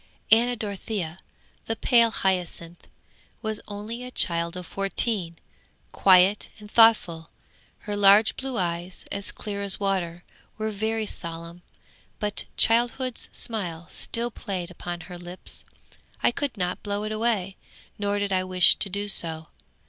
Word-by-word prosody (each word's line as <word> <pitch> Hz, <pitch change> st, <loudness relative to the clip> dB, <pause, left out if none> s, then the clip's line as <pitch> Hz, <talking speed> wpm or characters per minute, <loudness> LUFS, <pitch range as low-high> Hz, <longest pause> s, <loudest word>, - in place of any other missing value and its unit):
'Anna 240 Hz, +2 st, +5 dB
Dorothea, 200 Hz, -5 st, -4 dB, 0.5 s
the 225 Hz, -, -1 dB
pale 235 Hz, 0 st, +4 dB
hyacinth, 180 Hz, -4 st, -2 dB, 0.6 s
was 220 Hz, -1 st, -3 dB
only 215 Hz, +4 st, -6 dB
a 250 Hz, -, -6 dB
child 170 Hz, -6 st, 0 dB
of 180 Hz, -, -6 dB
fourteen, 195 Hz, -2 st, -1 dB, 0.6 s
quiet 190 Hz, +1 st, +5 dB
and 210 Hz, -1 st, -13 dB
thoughtful. 195 Hz, -8 st, +4 dB, 0.5 s
Her 205 Hz, -2 st, -4 dB
large 205 Hz, +2 st, +6 dB
blue 265 Hz, -2 st, -4 dB
eyes, 175 Hz, 0 st, -2 dB
as 200 Hz, 0 st, -2 dB
clear 200 Hz, -1 st, -5 dB
as 200 Hz, -1 st, +3 dB
water, 180 Hz, -4 st, -1 dB, 0.3 s
were 220 Hz, 0 st, -2 dB
very 220 Hz, +2 st, -1 dB
solemn, 170 Hz, -2 st, -6 dB, 0.6 s
but 210 Hz, -1 st, -2 dB
childhood's 240 Hz, +2 st, +1 dB
smile 175 Hz, -7 st, -3 dB
still 235 Hz, +1 st, -1 dB
played 185 Hz, -4 st, -5 dB
upon 175 Hz, 0 st, -6 dB
her 180 Hz, -1 st, -9 dB
lips; 175 Hz, +1 st, -8 dB, 0.6 s
I -, -, +5 dB
could 275 Hz, -2 st, -3 dB
not 180 Hz, -1 st, -2 dB
blow 205 Hz, 0 st, -2 dB
it 215 Hz, -, -3 dB
away, 215 Hz, -4 st, -1 dB, 0.4 s
nor 205 Hz, 0 st, 0 dB
did 205 Hz, -1 st, -1 dB
I 185 Hz, 0 st, +2 dB
wish 185 Hz, -1 st, +6 dB
to 200 Hz, -, +1 dB
do 200 Hz, +2 st, -1 dB
so. 160 Hz, -5 st, -2 dB
200 Hz, 140 wpm, -25 LUFS, 180-220 Hz, 0.6 s, large